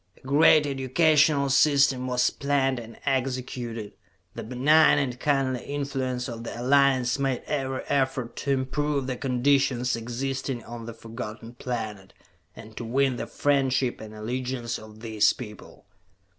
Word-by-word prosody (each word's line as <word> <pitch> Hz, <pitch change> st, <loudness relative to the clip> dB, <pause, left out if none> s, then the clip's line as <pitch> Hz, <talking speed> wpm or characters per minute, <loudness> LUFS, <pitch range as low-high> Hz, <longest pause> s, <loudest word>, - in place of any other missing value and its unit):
A -, -, -22 dB
great 150 Hz, +2 st, +5 dB
educational 145 Hz, +2 st, +3 dB
system 140 Hz, -2 st, +3 dB
was 125 Hz, -1 st, +2 dB
planned 135 Hz, -2 st, 0 dB
and 115 Hz, -1 st, -11 dB
executed, 125 Hz, -5 st, -2 dB, 0.4 s
the -, -, -6 dB
benign 140 Hz, +7 st, +4 dB
and 125 Hz, -4 st, -1 dB
kindly 135 Hz, -4 st, 0 dB
influence 135 Hz, -3 st, -3 dB
of 115 Hz, -2 st, -6 dB
the 115 Hz, -, -6 dB
Alliance 130 Hz, -1 st, +3 dB
made 135 Hz, -2 st, -1 dB
every 135 Hz, -3 st, -2 dB
effort 135 Hz, -3 st, -1 dB
to 140 Hz, -, -2 dB
improve 140 Hz, +1 st, 0 dB
the 130 Hz, -1 st, -2 dB
conditions 130 Hz, -1 st, +1 dB
existing 125 Hz, +2 st, -4 dB
on 115 Hz, -1 st, -8 dB
the 115 Hz, -, -6 dB
Forgotten 115 Hz, 0 st, -8 dB
Planet, 110 Hz, -6 st, -5 dB, 0.4 s
and 110 Hz, 0 st, -12 dB
to -, -, -4 dB
win 130 Hz, +2 st, +1 dB
the -, -, -4 dB
friendship 135 Hz, -3 st, +1 dB
and 110 Hz, 0 st, -9 dB
allegiance 120 Hz, +1 st, -3 dB
of 110 Hz, 0 st, -13 dB
these 110 Hz, -2 st, +2 dB
people. 105 Hz, -5 st, -11 dB
130 Hz, 140 wpm, -26 LUFS, 120-140 Hz, 0.4 s, great